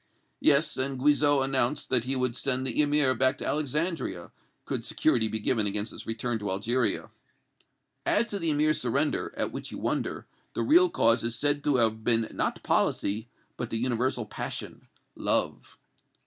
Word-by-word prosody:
"Yes; 150 Hz, +1 st, +3 dB
and 135 Hz, 0 st, -1 dB
Guizot 145 Hz, 0 st, +3 dB
announced 135 Hz, +1 st, 0 dB
that 125 Hz, -2 st, +2 dB
he 135 Hz, +1 st, -1 dB
would 125 Hz, -2 st, -1 dB
send 130 Hz, 0 st, +1 dB
the 130 Hz, +3 st, +1 dB
Emir 145 Hz, -2 st, +3 dB
back 130 Hz, +2 st, +1 dB
to -, -, -6 dB
Alexandria, 150 Hz, -, -2 dB, 0.3 s
could -, -, -4 dB
security 110 Hz, -2 st, +1 dB
be 110 Hz, +1 st, -2 dB
given 110 Hz, -1 st, +1 dB
against 105 Hz, +2 st, -1 dB
his -, -, -8 dB
return 115 Hz, +1 st, -3 dB
to 105 Hz, -1 st, -4 dB
Algeria." 110 Hz, +3 st, -1 dB, 0.9 s
"As 225 Hz, -, +2 dB
to 205 Hz, -3 st, -4 dB
the 165 Hz, -2 st, -1 dB
Emir's 155 Hz, +1 st, +2 dB
surrender, 140 Hz, +5 st, 0 dB
at -, -, -1 dB
which -, -, -6 dB
you -, -, -7 dB
wonder, -, -, -3 dB, 0.3 s
the -, -, -1 dB
real 350 Hz, +4 st, +5 dB
cause 115 Hz, -, +3 dB
is 115 Hz, 0 st, -1 dB
said 145 Hz, +4 st, +2 dB
to 145 Hz, -, +2 dB
have 110 Hz, -2 st, +1 dB
been 115 Hz, -1 st, +3 dB
not -, -, -2 dB
policy, 110 Hz, +4 st, 0 dB, 0.3 s
but 120 Hz, -, -4 dB
the 115 Hz, -, -2 dB
universal 125 Hz, 0 st, -1 dB
passion -, -, -6 dB, 0.3 s
love." -, -, -1 dB
130 Hz, 170 wpm, -27 LUFS, 115-145 Hz, 0.9 s, real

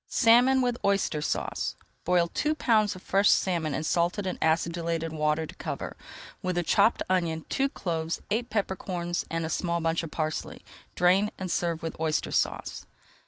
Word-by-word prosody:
SALMON 250 Hz, +3 st, +5 dB
WITH 245 Hz, -1 st, 0 dB
OYSTER 195 Hz, -6 st, +1 dB
SAUCE -, -, -2 dB, 0.3 s
Boil 175 Hz, -1 st, +3 dB
two 305 Hz, +2 st, 0 dB
pounds 215 Hz, -8 st, +2 dB
of 185 Hz, -, -12 dB
fresh 200 Hz, +2 st, +3 dB
salmon 165 Hz, -6 st, +2 dB
in 155 Hz, -, -2 dB
salted 175 Hz, +5 st, 0 dB
and 185 Hz, -, -3 dB
acidulated 165 Hz, 0 st, 0 dB
water 155 Hz, +1 st, 0 dB
to -, -, -10 dB
cover, -, -, -5 dB, 0.5 s
with 185 Hz, -1 st, -2 dB
a 175 Hz, -, +1 dB
chopped 205 Hz, +6 st, +3 dB
onion, 170 Hz, -4 st, 0 dB
two 275 Hz, 0 st, +1 dB
cloves, 165 Hz, -7 st, -3 dB
eight 235 Hz, +3 st, 0 dB
pepper 200 Hz, -3 st, -1 dB
corns, 175 Hz, -2 st, -3 dB
and 165 Hz, 0 st, -2 dB
a -, -, -2 dB
small 170 Hz, +1 st, -1 dB
bunch 165 Hz, 0 st, 0 dB
of 165 Hz, -, -6 dB
parsley. 155 Hz, 0 st, -4 dB, 0.3 s
Drain, 185 Hz, +4 st, +4 dB
and 185 Hz, -2 st, -4 dB
serve 170 Hz, -2 st, -1 dB
with 165 Hz, -, -4 dB
Oyster 160 Hz, -1 st, 0 dB
Sauce. -, -, -1 dB
175 Hz, 170 wpm, -27 LUFS, 165-200 Hz, 0.5 s, SALMON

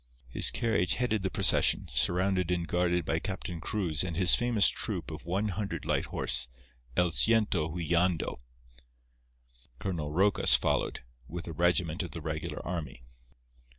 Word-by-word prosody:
His -, -, +2 dB
carriage 95 Hz, -7 st, 0 dB
headed 115 Hz, -4 st, -1 dB
the 95 Hz, -, -2 dB
procession, -, -, +3 dB
surrounded 90 Hz, 0 st, +1 dB
and 85 Hz, -1 st, -1 dB
guarded 90 Hz, 0 st, 0 dB
by 80 Hz, -, -1 dB
Captain 90 Hz, -3 st, -5 dB
Cruz 85 Hz, -8 st, -1 dB
and 85 Hz, -3 st, -4 dB
his 90 Hz, -2 st, +5 dB
famous 120 Hz, -4 st, +3 dB
troop -, -, -3 dB
of -, -, -9 dB
one 100 Hz, +5 st, -1 dB
hundred 100 Hz, +1 st, -4 dB
light -, -, 0 dB
horse 60 Hz, 0 st, +2 dB, 0.5 s
"El 90 Hz, -1 st, +2 dB
Ciento 105 Hz, -5 st, +3 dB
Huilando." 85 Hz, -2 st, -1 dB, 1.4 s
Colonel 80 Hz, -3 st, -4 dB
Rocas 95 Hz, +5 st, +5 dB
followed, -, -, 0 dB, 0.3 s
with 85 Hz, +4 st, -7 dB
a 85 Hz, -, -6 dB
regiment 85 Hz, +1 st, 0 dB
of 90 Hz, -, -5 dB
the 85 Hz, -, -7 dB
regular 80 Hz, 0 st, -5 dB
army. 75 Hz, -8 st, -6 dB
90 Hz, 145 wpm, -29 LUFS, 80-95 Hz, 1.4 s, his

